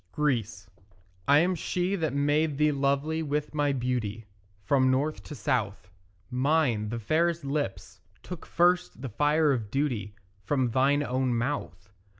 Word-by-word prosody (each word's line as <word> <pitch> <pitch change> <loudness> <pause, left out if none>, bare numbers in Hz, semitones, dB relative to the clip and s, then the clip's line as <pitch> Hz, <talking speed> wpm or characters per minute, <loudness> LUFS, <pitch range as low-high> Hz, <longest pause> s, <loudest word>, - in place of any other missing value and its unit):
GREECE 115 -9 -1 0.6
I 145 - +6
am 180 +2 +2
she 180 +2 -1
that 160 -5 -1
made 145 +1 +1
thee 150 0 +3
lovely 140 +3 0
with 150 0 -2
my 145 -1 +1
beauty 120 -5 -2 0.4
From 130 0 +3
north 140 +4 0
to 150 - -8
south: 110 -9 -2 0.4
Mine, 125 -5 +1
the 115 - -3
fairest 160 +7 0
lips, 135 -10 -3 0.2
took 180 -3 -8
first 175 -6 +1
the 135 - -3
fire 150 +6 +2
of 115 -6 -2
duty 120 -7 -2 0.3
From 130 +1 0
thine 140 +4 +3
own 130 -2 0
mouth. 115 -7 -3
140 Hz, 145 wpm, -28 LUFS, 120-150 Hz, 0.6 s, I